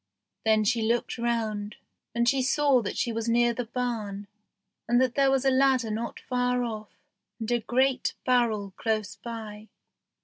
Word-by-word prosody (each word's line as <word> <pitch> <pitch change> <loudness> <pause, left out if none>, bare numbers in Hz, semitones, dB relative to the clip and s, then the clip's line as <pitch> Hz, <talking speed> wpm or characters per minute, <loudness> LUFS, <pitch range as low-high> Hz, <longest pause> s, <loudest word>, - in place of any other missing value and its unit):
Then 220 -1 +4
she 230 +2 +1
looked 235 +2 0
round, 220 -3 -1 0.4
and 235 0 +2
saw 275 0 +3
that 205 - -4
she 235 - 0
was 230 +1 -2
near 240 0 +3
the 245 +1 -3
barn, 220 -5 -3 0.6
and 240 +1 +3
that 255 -1 +2
there 275 0 +3
was 270 0 +1
a 270 - +5
ladder 260 -3 +3
not 230 +2 -4
far 250 0 0
off, 215 -3 -5 0.5
and 225 +1 -3
a 240 - +3
great 260 +3 +1
barrel 225 -6 +1
close 215 -3 -1
by. 220 -2 -8
235 Hz, 160 wpm, -27 LUFS, 220-250 Hz, 0.6 s, a